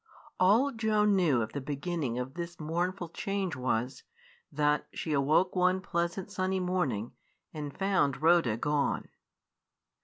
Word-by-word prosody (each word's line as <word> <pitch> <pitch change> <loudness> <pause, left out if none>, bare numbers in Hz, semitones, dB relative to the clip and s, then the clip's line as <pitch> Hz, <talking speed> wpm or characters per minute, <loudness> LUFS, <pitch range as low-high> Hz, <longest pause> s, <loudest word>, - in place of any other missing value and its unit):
All 220 +10 +4
Joan 215 -3 +2
knew 150 -11 +3
of 110 - -7
the 140 - -3
beginning 145 -2 -3
of 125 +1 -4
this 170 +1 -6
mournful 175 +3 -2
change 195 -1 -2
was, 125 0 -1 0.5
that 150 0 +1
she 155 - -3
awoke 150 +7 +2
one 185 +1 +3
pleasant 175 +2 -2
sunny 190 -1 -1
morning 155 - -1 0.4
and 150 -2 -5
found 185 -9 +1
Rhoda 160 -8 +4
gone. 145 +3 0
170 Hz, 130 wpm, -30 LUFS, 140-185 Hz, 0.5 s, All